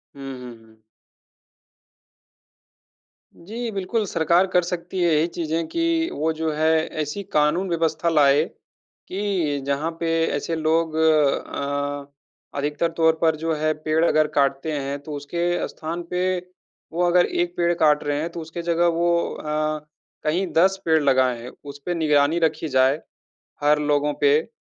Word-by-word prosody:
हुँ, 135 Hz, -1 st, -7 dB
हुँ, 125 Hz, -2 st, -9 dB
हुँ। 110 Hz, 0 st, -23 dB, 2.6 s
जी, 230 Hz, +7 st, -5 dB
बिल्कुल 200 Hz, +3 st, -1 dB
सरकार 170 Hz, +2 st, +2 dB
कर 180 Hz, -, +5 dB
सकती 180 Hz, +1 st, -4 dB
है 170 Hz, -2 st, +3 dB
ये 155 Hz, +3 st, +2 dB
चीज़ें 165 Hz, 0 st, -2 dB
कि 335 Hz, -, 0 dB
वो 160 Hz, +2 st, 0 dB
जो 160 Hz, 0 st, -2 dB
है 155 Hz, +1 st, +2 dB, 0.3 s
ऐसी 150 Hz, +7 st, -4 dB
कानून 155 Hz, +6 st, +2 dB
व्यवस्था 165 Hz, 0 st, 0 dB
लाए 145 Hz, -1 st, +4 dB, 0.6 s
कि 185 Hz, -8 st, -1 dB
जहाँ 140 Hz, +4 st, -1 dB
पे 165 Hz, -1 st, -1 dB, 0.3 s
ऐसे 165 Hz, +3 st, -2 dB
लोग 160 Hz, 0 st, +1 dB
अ, 145 Hz, -2 st, 0 dB, 0.5 s
अधिकतर 150 Hz, +3 st, -1 dB
तौर 160 Hz, -1 st, +4 dB
पर 160 Hz, -1 st, +3 dB
जो 165 Hz, -, +1 dB
है 155 Hz, +1 st, 0 dB
पेड़ 155 Hz, +1 st, +2 dB
अगर 155 Hz, -2 st, +3 dB
काटते 140 Hz, +2 st, +1 dB
हैं। 140 Hz, -1 st, -3 dB
तो 150 Hz, -, -8 dB
उसके 170 Hz, +5 st, -2 dB
स्थान 165 Hz, +2 st, -5 dB
पे 180 Hz, +1 st, 0 dB, 0.7 s
वो 175 Hz, +1 st, +1 dB
अगर 175 Hz, 0 st, +4 dB
एक 175 Hz, 0 st, -2 dB
पेड़ 175 Hz, 0 st, +2 dB
काट 150 Hz, -3 st, +3 dB
रहे 145 Hz, 0 st, -1 dB
हैं, 165 Hz, -, -2 dB
तो 170 Hz, -, -7 dB
उसकी 160 Hz, +2 st, -6 dB
जगह 170 Hz, 0 st, +2 dB
वो 170 Hz, +1 st, +1 dB, 0.3 s
अ, 155 Hz, 0 st, -2 dB, 0.4 s
कहीं 175 Hz, +5 st, +1 dB
10 190 Hz, +3 st, +4 dB
पेड़ 160 Hz, -1 st, +3 dB
लगाएँ। 130 Hz, -3 st, +2 dB
उसपे 145 Hz, +4 st, -5 dB
निगरानी 155 Hz, 0 st, +2 dB
रखी 160 Hz, -1 st, 0 dB
जाए 130 Hz, +3 st, +3 dB, 0.6 s
हर 150 Hz, +1 st, +4 dB
लोगों 145 Hz, 0 st, +1 dB
पे, 145 Hz, +1 st, +5 dB
अ, -, -, -8 dB
160 Hz, 150 wpm, -23 LUFS, 145-170 Hz, 2.6 s, कर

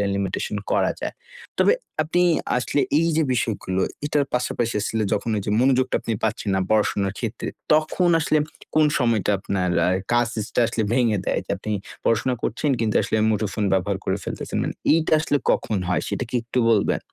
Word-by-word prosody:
Limitation 100 Hz, +1 st, -2 dB, 0.2 s
করা -, -, +2 dB
যায়। -, -, -4 dB, 0.5 s
তবে -, -, +5 dB, 0.3 s
আপনি 170 Hz, +3 st, +1 dB, 0.4 s
আসলে 130 Hz, +3 st, 0 dB, 0.2 s
এইযে 165 Hz, -1 st, +2 dB
বিষয়গুলো, 100 Hz, -5 st, -1 dB, 0.2 s
এটার 145 Hz, -1 st, +1 dB
পাশাপাশি 120 Hz, -1 st, -1 dB
আসলে 110 Hz, +1 st, -1 dB
যখন 105 Hz, +3 st, -2 dB
ওইযে 105 Hz, 0 st, -2 dB
মনোযোগটা 130 Hz, 0 st, +2 dB
আপনি 115 Hz, -, -2 dB
পাচ্ছেন 110 Hz, -1 st, -1 dB
না -, -, +2 dB
পড়াশোনার 105 Hz, -2 st, +1 dB
ক্ষেত্রে, 115 Hz, -1 st, -4 dB, 0.2 s
তখন 155 Hz, +3 st, +2 dB
আসলে 155 Hz, 0 st, +2 dB, 0.4 s
কোন 155 Hz, 0 st, +5 dB
সময়টা 115 Hz, -6 st, +2 dB
আপনার 95 Hz, -1 st, -1 dB, 0.2 s
আ -, -, +3 dB, 0.2 s
কাজ 120 Hz, 0 st, +3 dB
ইস 105 Hz, -, -3 dB
টা -, -, +4 dB
আসলে 115 Hz, -1 st, -1 dB
ভেঙে 120 Hz, -4 st, +2 dB
দেয়? -, -, 0 dB
যে -, -, -2 dB
আপনি 105 Hz, -, -5 dB, 0.3 s
পড়াশোনা 115 Hz, +3 st, +2 dB
করছেন 140 Hz, +6 st, 0 dB
কিন্তু, 110 Hz, -2 st, 0 dB
আসলে 110 Hz, -, -1 dB
মুঠোফোন 105 Hz, 0 st, -1 dB
ব্যবহার 95 Hz, +1 st, 0 dB
করে 95 Hz, -, 0 dB
ফেলতেছেন। -, -, -4 dB
মানে -, -, -3 dB, 0.2 s
এইটা 160 Hz, 0 st, +2 dB
আসলে 145 Hz, -2 st, +1 dB
কখন 105 Hz, -, 0 dB
হয়? 90 Hz, -, +1 dB
সেটা -, -, -2 dB
কি -, -, -3 dB
একটু 120 Hz, +2 st, -2 dB
বলবেন? 105 Hz, -3 st, +2 dB
115 Hz, 175 wpm, -23 LUFS, 105-130 Hz, 0.5 s, তবে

